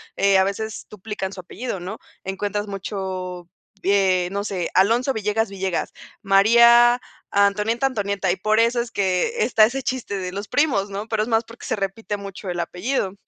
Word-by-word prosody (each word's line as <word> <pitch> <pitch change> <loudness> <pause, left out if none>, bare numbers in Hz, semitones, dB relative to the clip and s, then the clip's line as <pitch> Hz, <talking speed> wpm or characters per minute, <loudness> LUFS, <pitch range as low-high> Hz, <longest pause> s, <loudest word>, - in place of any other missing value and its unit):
eh, 200 -1 +4
a 190 - +4
veces 220 +2 -4
duplican 210 -2 -5
su 185 - -7
apellido, 200 +2 -6
¿no? 190 +5 -6 0.2
Encuentras, 205 +2 -3
mucho, 185 -3 -5 0.3
eh, 190 -2 +2
no 200 +1 -2
sé, 185 -4 -2
Alonso 230 +8 +3
Villegas 220 0 0
Villegas, 190 -3 -2 0.3
María 235 +5 +6 0.3
Antonieta 210 +5 +2
Antonieta. 200 -6 0
Y 180 - -1
por 215 +3 +2
eso 235 +1 +2
es 235 -1 -6
que 200 - 0
está 220 -3 +5
ese 260 +4 -3
chiste 250 -6 -3
de 185 -1 -4
los 200 +2 -5
primos, 250 -10 +1
¿no?, 200 +3 -5
pero 220 -1 0
es 215 - -1
más 225 0 +2
porque 230 +1 -12
se - - -1
repite 205 +1 -3
mucho 200 -1 -8
el 175 -1 -3
apellido. 190 +3 -2
200 Hz, 175 wpm, -22 LUFS, 190-225 Hz, 0.3 s, María